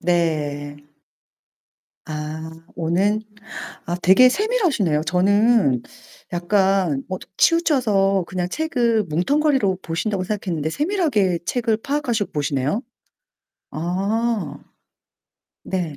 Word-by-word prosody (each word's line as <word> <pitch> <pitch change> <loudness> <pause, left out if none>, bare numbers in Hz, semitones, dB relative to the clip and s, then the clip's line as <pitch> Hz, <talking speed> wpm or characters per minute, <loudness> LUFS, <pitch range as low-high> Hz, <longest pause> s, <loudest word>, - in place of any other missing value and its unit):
네. 150 -4 -1 1.3
아 155 +1 -5 0.3
오는. 185 +6 +1 0.7
아 175 +1 -1
되게 220 +8 +7
세밀하시네요. 315 - +1
저는 190 - +3 0.5
약간 185 -4 +1
뭐 185 0 -3 0.2
치우쳐서 215 - +3
그냥 180 -1 -2
책을 240 - +1
뭉텅거리로 200 - +1
보신다고 185 +4 -2
생각했는데 175 -7 -2
세밀하게 285 - +1
책을 230 +1 0
파악하시고 245 -5 -1
보시네요. 145 - -1 0.9
아. 190 -1 -1 1.1
네. 175 -6 -3
190 Hz, 215 characters per minute, -21 LUFS, 165-235 Hz, 1.3 s, 되게